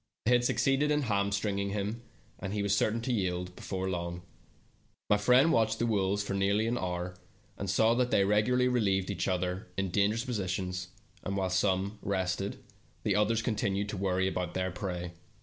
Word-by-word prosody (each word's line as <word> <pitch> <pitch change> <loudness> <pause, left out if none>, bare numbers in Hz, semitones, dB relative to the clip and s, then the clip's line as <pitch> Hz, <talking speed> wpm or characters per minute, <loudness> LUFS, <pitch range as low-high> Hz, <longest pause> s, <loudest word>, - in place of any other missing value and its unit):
They 115 - +3
had 120 0 +4
succeeded 135 +4 +2
in 150 -1 +2
hamstringing 100 -2 0
him, 105 +3 -3 0.4
and 95 +1 -4
he 105 - 0
was 100 0 +2
certain 110 +3 +1
to 125 +2 -1
yield 90 -3 -2
before 95 -1 -4
long. 85 -1 -3 0.9
My 105 - +6
friend 125 +9 +5
watched 110 -3 +2
the 120 - 0
wolves 100 -2 +1
for 100 - -3
nearly 100 +2 +2
an 115 +2 0
hour, 90 -4 -3 0.4
and 100 - -4
saw 110 +5 +4
that 125 +1 +1
they 100 - +3
regularly 125 +5 +3
relieved 100 -7 +1
each - - -2
other 90 +1 -1
in 95 -2 -1
dangerous 105 +5 +1
positions, 95 -5 -2 0.3
and 100 0 -3
while 95 -1 0
some 95 +2 +1
rested, 95 0 -2 0.4
the 100 - +1
others 110 +2 +2
continued 100 -3 -1
to 105 - -4
worry 95 0 +1 0.3
their 95 0 -1
prey. 90 -3 -4
100 Hz, 175 wpm, -30 LUFS, 95-110 Hz, 0.9 s, My